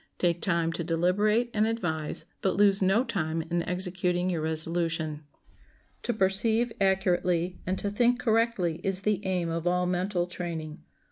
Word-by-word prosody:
Take 175 -1 +1
time 170 -3 +1
to 170 - -3
deliberate 205 +8 +1
and 215 0 +2
advise, 175 -9 -2 0.2
but 190 - 0
lose 200 -1 +4
no 195 +6 +3
time 165 -8 -2
in 175 0 +1
executing 180 0 0
your 165 -3 -1
resolution. 160 -1 -1 0.8
To - - -1
perceive 220 +3 +1
accurately 180 -2 +1
and 185 +1 0
to 200 - -2
think 240 +4 +3
correctly 225 -8 +1
is 190 -1 -1
the 210 -1 0
aim 180 -3 0
of 165 +1 -2
all 180 0 +2
mental 180 0 0
training. 165 -3 -6
180 Hz, 150 wpm, -28 LUFS, 170-205 Hz, 0.8 s, lose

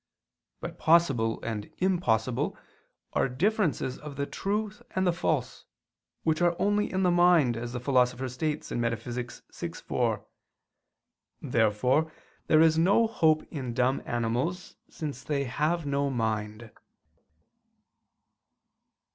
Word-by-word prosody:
But - - -7
possible 140 -9 +3
and 110 -2 -4
impossible 130 - 0 0.6
are - - +1
differences 165 - 0
of 150 -2 -8
the 140 +1 -2
true 205 +6 -2 0.2
and 185 0 +1
the 175 - +3
false, 155 -6 -2 0.6
which 160 +1 +1
are 175 -1 +3
only 205 +1 +1
in 190 0 0
the 180 - +4
mind, 175 -8 +4
as 120 +1 -5
the 125 - -4
Philosopher 125 0 +1
states 150 +5 -3
(Metaph. 120 +1 -3
vi, - - -5 0.2
4). - - 0 1.2
Therefore 125 +7 +2 0.4
there 155 - +5
is 160 0 +4
no 200 +7 +4
hope 160 -8 +2
in 130 -6 -4
dumb 125 +2 +1
animals, 120 +10 -2
since 145 -5 -6
they 140 -2 -1
have 150 +5 -1
no 140 0 0
mind. 110 -2 -3
140 Hz, 120 wpm, -28 LUFS, 120-170 Hz, 1.2 s, there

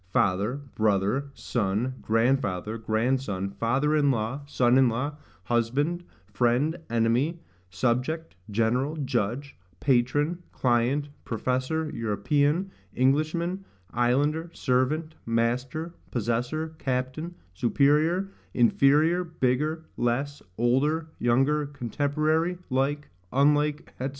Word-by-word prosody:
father, 105 +3 +1
brother, 110 +6 +1
son, 115 +3 -1
grandfather, 115 -3 +1
grandson, 110 -3 -1
father 130 +9 +1
in 145 -2 +3
law, 125 +2 -1
son 125 -2 +3
in 130 -2 +5
law, 125 +6 -1 0.3
husband, 130 - 0 0.3
friend, 125 +9 +2
enemy, 120 +8 +1 0.3
subject, 130 - -1
general, 120 +8 +1
judge, 125 +4 -2 0.2
patron, 145 +6 +1
client, 125 +4 +1 0.2
professor, 130 +7 -1
European, 145 - 0 0.2
Englishman, 155 +8 +1 0.3
islander, 145 +7 +1
servant, 150 +5 0
master, 125 +8 -1 0.2
possessor, 125 +8 -2
captain, 130 +6 -2 0.2
superior, 150 - +2 0.2
inferior, 150 +8 +4
bigger, 155 0 -1
less, 135 +4 -1 0.2
older, 140 +7 +1
younger, 135 +5 +2
contemporary, 155 +6 0
like, 140 +3 0 0.2
unlike, 150 +2 +2
&c. 130 - 0
130 Hz, 90 wpm, -27 LUFS, 120-150 Hz, 0.3 s, in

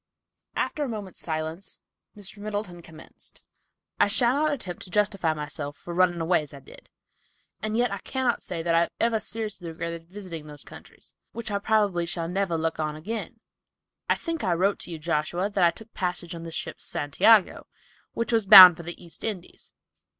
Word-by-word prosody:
After 300 - -1
a 275 - -3
moment's 205 -5 -7
silence 160 +3 -5 0.4
Mr. 205 0 -8
Middleton 205 -4 -4
commenced: 160 -2 -14 0.6
"I - - +5
shall 235 +4 +3
not 305 +2 +1
attempt 200 -11 -5
to - - -10
justify 195 -5 +1
myself 145 -1 -6
for 175 - -8
running 175 -1 +2
away 165 0 +2
as 150 -1 -11
I - - -10
did, 135 - -16 0.7
and 215 +1 0
yet 240 -2 +2
I 200 - -3
cannot 260 0 -1
say 170 -2 -5
that 170 0 +1
I 165 - +5
have 170 - +1
ever 230 -1 +2
seriously 215 -5 -4
regretted 170 0 -6
visiting 180 -6 -8
those 145 -1 -8
countries, - - -14 0.2
which 230 -2 -5
I 200 - 0
probably 200 -5 +1
shall 165 -1 -3
never 180 -1 -1
look 160 0 -2
upon 155 -1 -2
again. 220 +7 -6 0.7
I - - +4
think 330 -3 -4
I - - +1
wrote 195 +4 +1
to - - -6
you, 165 - -5
Joshua, 170 +5 -1
that 195 -2 +1
I 170 - +7
took 220 +5 -11
passage 180 -2 -3
on 165 - -7
the 165 0 -7
ship - - -4
Santiago, 195 +8 +3 0.5
which 230 +1 -2
was 225 -3 +2
bound 185 -4 +12
for - - -7
the 175 +1 -7
East 170 -2 -12
Indies. 195 -5 -6
180 Hz, 190 wpm, -26 LUFS, 165-215 Hz, 0.7 s, bound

